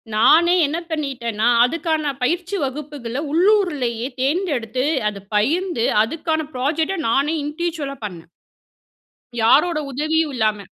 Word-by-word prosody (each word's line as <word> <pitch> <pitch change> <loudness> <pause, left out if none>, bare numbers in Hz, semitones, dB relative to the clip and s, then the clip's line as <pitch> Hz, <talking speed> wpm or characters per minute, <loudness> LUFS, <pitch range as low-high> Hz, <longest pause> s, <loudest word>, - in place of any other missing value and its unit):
நானே 330 +11 +5
என்ன 320 +4 -2
பண்ணிட்டேனா? 245 -8 -2 0.2
அதுக்கான 315 +1 -1
பயிற்சி 355 +7 -1
வகுப்புகள 275 -2 -5
உள்ளூருலேயே 315 - +1
தேர்ந்தெடுத்து 265 - -1 0.2
அத 200 -1 -9
பயிர்ந்து 305 - +1 0.2
அதுக்கான 315 +5 -2
ப்ராஜெக்ட்ட 310 +8 -1
நானே 280 +6 +2
இண்டிவிஜுவலா 300 -2 -3
பண்ணே. 175 -5 -8 1.2
யாரோட 305 +8 +4
உதவியும் 310 +3 0
இல்லாம. 215 -2 +1
295 Hz, 100 wpm, -20 LUFS, 240-330 Hz, 1.2 s, நானே